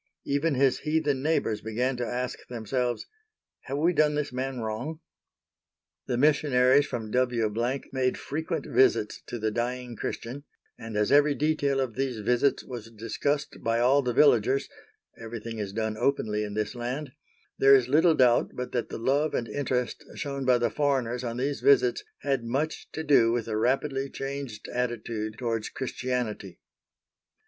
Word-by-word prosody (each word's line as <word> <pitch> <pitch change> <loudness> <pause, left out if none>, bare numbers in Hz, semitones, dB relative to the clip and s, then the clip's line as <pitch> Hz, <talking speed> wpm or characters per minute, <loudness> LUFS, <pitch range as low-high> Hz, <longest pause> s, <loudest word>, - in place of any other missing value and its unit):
Even 145 +2 +1
his 135 0 +3
heathen 150 -3 0
neighbors 135 -8 0
began 125 +4 -1
to 120 - -2
ask 125 +1 -3
themselves, 120 +1 -2 0.6
"Have 135 +1 -3
we 165 +4 +3
done 150 -2 +3
this 145 -3 -2
man 130 0 -3
wrong?" 115 +8 -4 1.1
The 120 - 0
missionaries 140 -1 +4
from 110 -3 -5
W—— 120 -3 +1 0.4
made 130 -1 0
frequent 160 0 -3
visits 110 -5 +2
to 120 - -4
the 110 -1 -1
dying 120 +1 -3
Christian, 125 +5 -5 0.3
and 115 -2 -6
as 105 +3 +1
every 145 0 +5
detail 145 -2 +1
of 130 -4 -1
these 130 -2 -2
visits 120 +6 +1
was 120 -3 -7
discussed 115 +7 -2
by 115 0 +1
all 130 +4 +4
the 125 -2 -1
villagers 130 0 +4 0.5
(everything 115 0 -6
is 100 -2 -3
done 110 +1 -2
openly 110 -4 0
in 105 -1 -5
this 110 +1 -1
land) 125 +4 -4 0.5
there 135 0 +8
is 130 -3 +3
little 160 +4 +4
doubt 125 -2 +3
but 125 0 -4
that 120 -2 -2
the - - -5
love 140 +6 +1
and 115 - -1
interest 125 -3 -2
shown 140 -1 -4
by 125 -1 +5
the 120 -2 0
foreigners 130 -3 0
on 120 -1 -3
these 140 +3 -2
visits 415 -1 +4 0.2
had 135 -4 0
much 140 +7 -2
to 160 - -3
do 135 -7 +5
with 120 -1 -1
the 110 - -3
rapidly 135 +4 0
changed 135 -6 -6
attitude 115 -3 -3
towards 115 -3 -2
Christianity. 125 -7 -3
125 Hz, 160 wpm, -27 LUFS, 115-140 Hz, 1.1 s, there